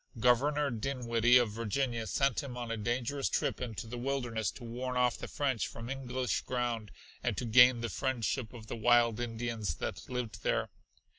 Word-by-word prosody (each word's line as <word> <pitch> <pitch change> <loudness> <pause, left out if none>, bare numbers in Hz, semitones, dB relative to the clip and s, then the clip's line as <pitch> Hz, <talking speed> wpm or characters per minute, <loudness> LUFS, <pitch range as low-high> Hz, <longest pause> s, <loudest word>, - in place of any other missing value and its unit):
Governor 140 +5 +3
Dinwiddie 120 0 +3
of 120 -4 +2
Virginia 115 +1 -1
sent 135 -3 +1
him 130 -3 -7
on 120 -2 -4
a - - 0
dangerous 120 +5 -1
trip - - -1
into 115 -3 -4
the 120 +2 -6
wilderness 120 -6 -1
to 120 - -9
warn 125 +2 -3
off 125 -1 +3
the - - -7
French 135 -5 -1
from 115 +2 -7
English 130 -2 -2
ground 120 -4 -2 0.3
and - - -1
to 125 - -2
gain 125 +1 +7
the 115 - -1
friendship 125 -2 -1
of 115 -3 -10
the 110 - -5
wild 115 0 +4
Indians 115 -6 -2
that 95 - -5
lived 125 -3 -4
there. - - 0
120 Hz, 175 wpm, -32 LUFS, 115-130 Hz, 0.3 s, gain